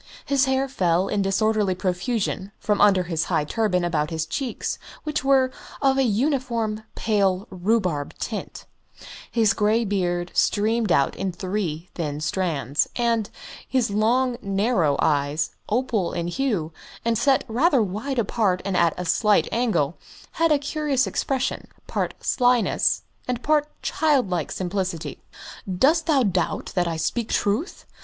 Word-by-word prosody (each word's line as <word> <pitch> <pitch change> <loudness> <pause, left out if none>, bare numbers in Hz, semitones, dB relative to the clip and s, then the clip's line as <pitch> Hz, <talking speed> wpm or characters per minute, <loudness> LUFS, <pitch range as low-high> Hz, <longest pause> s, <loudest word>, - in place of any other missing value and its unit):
His 280 0 +3
hair 265 0 +1
fell 185 -7 +1
in 205 - 0
disorderly 200 0 +1
profusion 190 +2 -2
from 210 -1 0
under 195 -3 +5
his 165 -2 -1
high - - +1
turban 180 0 0
about 155 -3 0
his 160 -1 -2
cheeks, 260 - -3 0.2
which 305 -3 -2
were 265 -1 +3 0.3
of 270 -1 +2
a - - +4
uniform 235 -2 0
pale 200 -3 +1
rhubarb 185 -6 0
tint; - - -5 0.6
his 225 -2 +3
grey 220 +2 +2
beard 175 -3 -1
streamed 220 0 +1
out 140 -3 +3
in 195 - -2
three 180 -3 -3
thin 150 -4 -3
strands, 150 -4 0
and 230 -3 +1 0.4
his 255 -5 +1
long, 240 +4 +2
narrow 195 - +1
eyes, 145 +1 +1 0.2
opal 220 -5 0
in 170 0 -2
hue, 195 - -1 0.3
and 230 0 +2
set 260 +4 +3
rather 255 +2 +3
wide 215 +8 -3
apart 210 -4 +1
and 195 -2 -1
at 170 -2 +3
a 180 - -4
slight 210 +5 +3
angle, 215 - 0 0.3
had 330 -1 +1
a 300 - +5
curious 285 -2 0
expression, 265 -1 -2 0.2
part - - -2
slyness 245 -2 +2 0.2
and 250 -1 -2
part 300 -1 +2 0.2
childlike 250 - +1
simplicity. 185 -2 -3 0.5
"Dost 305 - +3
thou 285 -5 +4
doubt 185 -5 -1
that 180 -2 +1
I 165 -1 -2
speak 225 +7 -2
truth? 220 - -1
210 Hz, 140 wpm, -24 LUFS, 180-250 Hz, 0.6 s, under